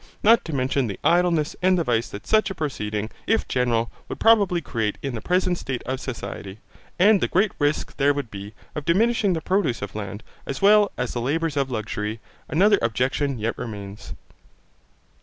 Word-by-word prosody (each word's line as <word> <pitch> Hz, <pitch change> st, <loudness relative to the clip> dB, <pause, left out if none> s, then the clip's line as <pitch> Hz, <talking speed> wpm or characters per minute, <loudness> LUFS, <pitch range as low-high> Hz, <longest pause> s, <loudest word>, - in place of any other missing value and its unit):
Not 230 Hz, +2 st, +6 dB
to 165 Hz, -, -5 dB
mention 130 Hz, 0 st, 0 dB
the 100 Hz, -, -6 dB
idleness 170 Hz, -3 st, +2 dB
and 185 Hz, 0 st, +4 dB
the 170 Hz, -, +1 dB
vice 120 Hz, -4 st, 0 dB
that 100 Hz, -, -9 dB
such 215 Hz, 0 st, +3 dB
a 195 Hz, -, -5 dB
proceeding, 110 Hz, -9 st, -3 dB, 0.2 s
if 225 Hz, 0 st, +1 dB
general, 120 Hz, -2 st, 0 dB, 0.2 s
would -, -, -5 dB
probably 205 Hz, -6 st, +4 dB
create 110 Hz, -9 st, -2 dB
in 135 Hz, -2 st, -3 dB
the 115 Hz, -, -4 dB
present 180 Hz, -, +1 dB
state 130 Hz, -2 st, -4 dB
of 130 Hz, +1 st, -3 dB
society, 100 Hz, -6 st, -6 dB, 0.4 s
and 200 Hz, +2 st, +5 dB
the -, -, +2 dB
great 195 Hz, +4 st, +2 dB
risk 145 Hz, +1 st, 0 dB
there 145 Hz, 0 st, +4 dB
would 140 Hz, -5 st, -4 dB
be, 100 Hz, +1 st, -8 dB, 0.2 s
of 150 Hz, -, -4 dB
diminishing 205 Hz, +4 st, +2 dB
the 160 Hz, -, -2 dB
produce 185 Hz, -, 0 dB
of 100 Hz, -, -6 dB
land, 105 Hz, 0 st, -6 dB, 0.2 s
as 135 Hz, -, -3 dB
well 205 Hz, 0 st, +5 dB
as 125 Hz, -1 st, -2 dB
the 120 Hz, -, -2 dB
labours 155 Hz, +4 st, -1 dB
of 135 Hz, -2 st, 0 dB
luxury, 110 Hz, -2 st, -3 dB, 0.3 s
another 200 Hz, +7 st, +4 dB
objection 130 Hz, +4 st, 0 dB
yet 115 Hz, +1 st, -2 dB
remains. 100 Hz, -3 st, -7 dB
140 Hz, 185 wpm, -24 LUFS, 115-180 Hz, 0.4 s, Not